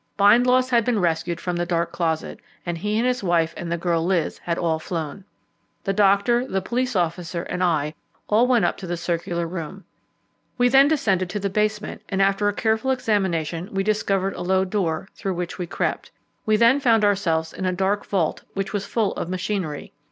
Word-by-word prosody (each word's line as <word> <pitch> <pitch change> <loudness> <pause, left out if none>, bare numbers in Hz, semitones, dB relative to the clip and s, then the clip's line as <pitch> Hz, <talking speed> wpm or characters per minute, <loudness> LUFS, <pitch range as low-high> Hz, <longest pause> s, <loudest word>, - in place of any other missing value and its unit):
Bindloss 250 +5 +5
had 235 -1 +4
been 240 0 +1
rescued 170 -1 0
from 180 0 -3
the 175 - 0
dark 170 -1 0
closet, 160 -2 -2 0.3
and 175 -1 -2
he 210 +4 -1
and 235 - +1
his 250 0 0
wife 170 -3 +1
and 170 -1 -5
the 170 - 0
girl 170 -1 0
Liz 175 -2 0
had 170 -1 -2
all 160 -2 0
flown. 160 +2 -5 0.6
The 195 - 0
doctor, 200 +4 +3
the 195 - 0
police 245 +5 -2
officer, 170 -1 -1
and 180 0 -3
I, 155 -4 +1 0.3
all 225 +4 +4
went 240 -7 +3
up - - 0
to 190 - -7
the 175 0 -2
circular 170 0 -2
room. 180 +3 -7 0.7
We 245 0 +4
then 270 +2 +6
descended 195 - +1
to 205 - -3
the 200 -1 -2
basement, 210 +1 -1
and 195 - -1
after 195 +1 +3
a - - -2
careful 220 +4 0
examination 190 -9 0
we 195 0 0
discovered 195 -2 0
a - - -7
low 190 +1 +2
door, 185 -4 -1
through 195 -2 -3
which 175 +1 -4
we 175 - -3
crept; - - -2 0.4
we 215 - +4
then 235 +5 +5
found 230 -5 +3
ourselves 165 -6 +1
in 190 - -3
a - - +2
dark 195 +3 0
vault, 180 -6 -1
which 195 +1 -3
was 200 -1 -2
full 220 -4 0
of 170 - -4
machinery. 185 -4 -3
190 Hz, 200 wpm, -23 LUFS, 170-210 Hz, 0.7 s, then